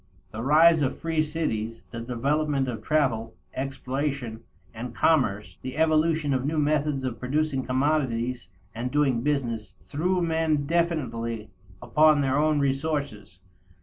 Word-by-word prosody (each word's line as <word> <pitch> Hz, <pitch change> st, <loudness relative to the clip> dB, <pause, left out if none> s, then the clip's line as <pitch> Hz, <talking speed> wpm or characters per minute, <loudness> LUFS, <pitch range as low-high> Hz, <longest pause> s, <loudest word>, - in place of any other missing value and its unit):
The 110 Hz, -, -5 dB
rise 155 Hz, +5 st, +5 dB
of 130 Hz, -, 0 dB
free 165 Hz, -1 st, 0 dB
cities, 115 Hz, -8 st, -3 dB
the 115 Hz, -1 st, -5 dB
development 135 Hz, +3 st, 0 dB
of 115 Hz, -4 st, -4 dB
travel, 115 Hz, -5 st, 0 dB, 0.2 s
exploration, 135 Hz, -3 st, -3 dB, 0.3 s
and 115 Hz, +1 st, -7 dB
commerce, 105 Hz, -, +1 dB
the 130 Hz, +2 st, -6 dB
evolution 155 Hz, -2 st, +2 dB
of 130 Hz, -1 st, 0 dB
new 155 Hz, +3 st, -1 dB
methods 150 Hz, -2 st, +1 dB
of 125 Hz, -3 st, -3 dB
producing 140 Hz, +1 st, 0 dB
commodities 130 Hz, -5 st, 0 dB, 0.2 s
and 120 Hz, +2 st, -3 dB
doing 135 Hz, -4 st, +2 dB
business, 115 Hz, -8 st, -2 dB
threw 180 Hz, +6 st, 0 dB
men 160 Hz, -3 st, +1 dB
definitely 130 Hz, -, -1 dB, 0.3 s
upon 155 Hz, -1 st, +4 dB
their 135 Hz, +1 st, +1 dB
own 155 Hz, 0 st, +2 dB
resources. 140 Hz, -, -2 dB
140 Hz, 130 wpm, -26 LUFS, 120-155 Hz, 0.3 s, rise